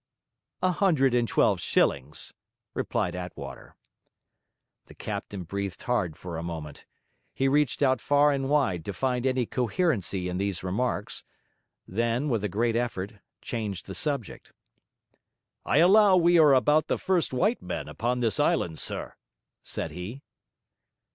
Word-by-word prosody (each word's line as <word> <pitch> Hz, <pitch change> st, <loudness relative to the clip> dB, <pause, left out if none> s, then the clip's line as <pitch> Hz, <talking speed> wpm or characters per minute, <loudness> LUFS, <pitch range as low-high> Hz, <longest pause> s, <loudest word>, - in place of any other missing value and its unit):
'A 185 Hz, -, +4 dB
hundred 155 Hz, -9 st, +2 dB
and 120 Hz, -1 st, +2 dB
twelve 100 Hz, -5 st, +2 dB
shillings,' 70 Hz, -2 st, 0 dB, 0.4 s
replied 90 Hz, -, -1 dB
Attwater. 90 Hz, -1 st, -8 dB, 1.1 s
The -, -, -15 dB
captain 100 Hz, -3 st, -5 dB
breathed 100 Hz, +2 st, -5 dB
hard 95 Hz, -11 st, -1 dB
for 85 Hz, -2 st, -6 dB
a -, -, -5 dB
moment. 80 Hz, -4 st, -7 dB, 0.5 s
He 135 Hz, -, +1 dB
reached 145 Hz, 0 st, +2 dB
out 130 Hz, -3 st, +3 dB
far 145 Hz, +1 st, +4 dB
and 135 Hz, -1 st, -1 dB
wide 130 Hz, -, +1 dB
to 100 Hz, -, -4 dB
find 125 Hz, +2 st, 0 dB
any 130 Hz, -2 st, +1 dB
coherency 115 Hz, -, 0 dB
in 90 Hz, 0 st, -3 dB
these 95 Hz, -3 st, -2 dB
remarks; 105 Hz, +7 st, -2 dB, 0.6 s
then, 115 Hz, +7 st, 0 dB
with 115 Hz, -5 st, 0 dB
a 105 Hz, -, 0 dB
great 115 Hz, +4 st, 0 dB
effort, 110 Hz, -3 st, -3 dB, 0.2 s
changed 105 Hz, -7 st, -4 dB
the 95 Hz, -, -7 dB
subject. 140 Hz, -2 st, -4 dB, 1.1 s
'I -, -, +2 dB
allow 195 Hz, +4 st, +6 dB
we 175 Hz, 0 st, +5 dB
are 150 Hz, -4 st, +7 dB
about 150 Hz, +4 st, +3 dB
the -, -, 0 dB
first 185 Hz, -3 st, +1 dB
white 205 Hz, -, +1 dB
men -, -, -4 dB
upon 125 Hz, +2 st, -2 dB
this 115 Hz, -5 st, +1 dB
island, 80 Hz, -3 st, +1 dB
sir,' -, -, -4 dB, 0.5 s
said 80 Hz, -, -4 dB
he. 95 Hz, -, -7 dB
120 Hz, 140 wpm, -27 LUFS, 95-140 Hz, 1.1 s, are